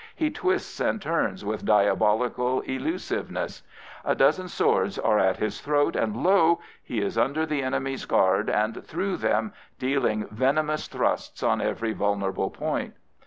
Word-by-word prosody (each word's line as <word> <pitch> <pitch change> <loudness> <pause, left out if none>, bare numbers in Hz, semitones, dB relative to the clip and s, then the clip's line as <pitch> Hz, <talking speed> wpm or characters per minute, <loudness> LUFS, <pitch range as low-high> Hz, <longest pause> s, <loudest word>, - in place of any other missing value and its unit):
He 310 -2 0
twists 375 +1 -1
and - - +1
turns 130 - -1
with 105 +1 -3
diabolical 110 +4 +2
elusiveness, 315 - -3 0.4
A - - +1
dozen 185 0 +3
swords 95 - +1
are 105 -1 +2
at 95 0 +2
his 110 - -3
throat, 145 0 +1
and 110 0 -1
lo! 170 -3 +5 0.2
he - - -3
is - - -1
under 150 +5 +1
the 150 -3 -1
enemy's 135 0 -2
guard 95 +3 +2
and 110 +2 0
through 185 +3 -2
them, 215 - 0 0.2
dealing 130 -5 0
venomous 150 +7 0
thrusts - - -2
on - - +2
every 115 -1 -1
vulnerable 100 -2 -1
point. - - -3
130 Hz, 145 wpm, -26 LUFS, 105-160 Hz, 0.4 s, lo